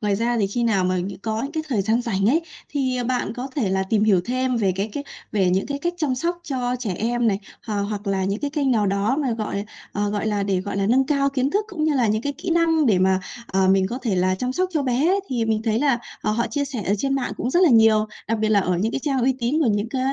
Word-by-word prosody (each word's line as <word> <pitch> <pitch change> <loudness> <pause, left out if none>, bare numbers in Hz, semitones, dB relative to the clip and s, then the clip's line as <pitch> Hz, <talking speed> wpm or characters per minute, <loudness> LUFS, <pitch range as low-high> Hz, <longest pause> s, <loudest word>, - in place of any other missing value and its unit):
Ngoài 205 -2 +1
ra 235 +2 0
thì 200 - +2
khi 240 +5 -2
nào 200 -5 +2
mà 185 0 +1
nh 180 +2 -2
có 220 0 -2
những 280 +3 -4
cái 315 -1 -2
thời 215 -7 +1
gian 225 +4 +1
rảnh 200 -4 0
ấy, 305 +8 +4 0.3
thì, 260 -3 -1
ờ, 245 - -2
bạn 245 -3 -1
có 255 +2 -5
thể 215 -9 +1
là 190 0 +1
tìm 210 +2 +1
hiểu 195 -5 +4
thêm 255 0 0
về 195 -4 +2
cái 195 +4 -2
cái 285 - -4 0.3
về 190 -4 +2
những 190 +2 +1
cái 280 0 -3
cách 345 +3 -2
chăm 295 -6 0
sóc 345 +6 -2
cho 250 -2 -2
trẻ 205 -7 -3
em 240 +1 0
này, 195 -1 +1 0.3
h - - -6 0.2
hoặc 205 -1 -5
là 190 -1 0
những 200 +2 -2
cái 290 - -2
kênh 280 -2 0
nào 215 -4 +2
đó 200 +7 +1
mà, 270 -6 0
gọi, 210 -2 -3 0.3
ờ, 205 0 -1
gọi 210 +1 -2
là, 205 -2 0
để, 195 -2 0
gọi 200 +1 -5
là, 195 0 +1
nâng 260 +4 +3
cao 280 -2 +2
kiến 270 0 0
thức 415 +4 +1
cũng 315 -5 -2
như 310 -2 +2
là 245 -4 +2
những 215 +2 0
cái 285 - -2
kỹ 355 +6 -6
năng 325 -3 +3
để 195 -5 +4
mà, 190 0 +3 0.3
ờ, 190 0 +1
mình 190 0 +4
có 245 +5 -4
thể 210 -7 0
là 185 +1 +2
chăm 250 +6 -2
sóc 370 +5 0
cho 305 -3 +1
bé 260 +4 +1
ấy. 395 +2 +2
Thì 235 -3 0
mình 220 -1 0
thấy 220 0 +1
là, 275 -4 +2 0.2
ờ, - - -1
họ 235 +2 0
chia 285 +5 -1
sẻ 260 -6 -5
ở 200 - +2
trên 275 +2 0
mạng 270 -2 -1
cũng 245 - -2
rất 345 - +3
là 335 - +6
nhiều. 220 -2 +5 0.2
Đặc 225 -1 0
biệt 215 0 +1
là 205 -2 +4
ở 180 -2 0
những 220 +4 0
cái - - -1
trang 275 -4 0
uy 260 +1 +3
tín 250 +6 0
của 245 - +2
những 205 +2 0
cá 260 - -3
230 Hz, 305 wpm, -23 LUFS, 200-270 Hz, 0.3 s, là